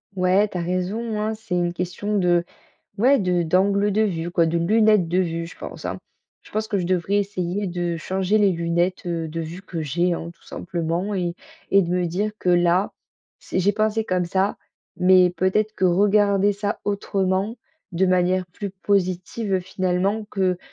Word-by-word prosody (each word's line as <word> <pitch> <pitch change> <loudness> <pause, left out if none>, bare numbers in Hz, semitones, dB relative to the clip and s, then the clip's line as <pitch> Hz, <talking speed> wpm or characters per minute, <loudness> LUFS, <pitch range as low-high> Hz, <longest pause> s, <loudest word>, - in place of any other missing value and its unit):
Ouais. 185 +3 +3
Tu 180 - -4
as - - -1
raison 195 +6 -2
hein. 215 +1 -1
C'est 215 -4 -5
une 175 -1 0
question 185 +4 -2
de 175 -2 +3 0.6
ouais, 270 +5 +5
de 180 -3 +1
d'angle 195 +4 +2
de 215 +2 +2
vue 175 -5 -1
quoi, 170 -2 +2
de 170 +1 0
lunettes 210 0 +3
de 180 - +1
vue, 165 -2 -1
je - - -12
pense - - -9
hein. - - -4 0.4
Je - - -18
pense 215 0 -2
que 205 - 0
je 175 - -2
devrais 185 +2 0
essayer 200 -1 -1
de 175 -1 -2
changer 190 +5 0
les 205 -2 +4
lunettes, 170 +2 -1
heu, 165 -2 -2
de 165 +2 -4
vue 165 +4 -7
que 170 -3 -6
j'ai 170 +5 0
hein 170 0 -4
tout - - -31
simplement 175 +3 -3
et 175 -2 -1 0.4
et 195 0 +5
de 170 - -4
me 180 0 +1
dire 205 +5 -1
que 180 - -3
là, 175 +2 +3 0.5
c'est 185 - -2
j'ai 200 +3 +3
pensé 220 +1 0
comme 185 -3 0
ça 190 +3 0 0.4
mais 180 0 +5
peut-être 195 +4 0
que 190 - -1
regarder 200 +2 +3
ça 205 +1 -3
autrement, 195 +1 -1 0.4
de 175 +2 +2
manière 185 0 +2
plus 200 +4 -6
positive 190 +1 -1
finalement, 185 +4 -1
que 185 -3 0
185 Hz, 185 wpm, -23 LUFS, 175-205 Hz, 0.6 s, ouais